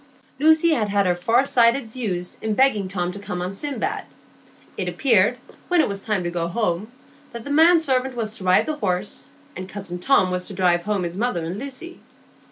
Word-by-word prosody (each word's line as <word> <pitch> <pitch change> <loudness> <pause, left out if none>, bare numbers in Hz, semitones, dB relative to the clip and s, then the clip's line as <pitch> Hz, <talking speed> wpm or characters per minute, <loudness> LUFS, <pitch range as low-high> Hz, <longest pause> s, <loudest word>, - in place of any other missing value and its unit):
Lucy 315 +3 +5
had 220 -9 +1
had 200 0 +2
her 180 - +3
far 225 +9 +2
sighted 240 0 +3
views 190 -8 -4
in 220 -1 -1
begging 215 -7 +3
Tom 180 -2 -2
to 200 - -9
come 180 -3 -5
on 180 +2 -3
Sindbad. 270 +3 -3 0.7
It - - -3
appeared, 230 -2 +2 0.3
when 355 -1 +2
it - - +4
was 200 -1 -3
time 210 -4 -1
to 175 - -3
go 170 -1 -2
home, 200 +2 -2 0.4
that 235 -1 -7
the 285 - -6
man 325 +4 +6
servant 265 -5 0
was 220 -2 -3
to - - -9
ride 185 0 +4
the 310 -1 -3
horse, 190 -4 -2 0.3
and 185 +1 -7
cousin 195 -3 -7
Tom 185 -3 +3
was 180 0 -2
to 195 - -8
drive 180 -2 +2
home 200 0 -1
his 175 +1 -4
mother 220 -7 -1
and 180 +5 -4
Lucy. 280 +7 -7
210 Hz, 205 wpm, -22 LUFS, 180-260 Hz, 0.7 s, man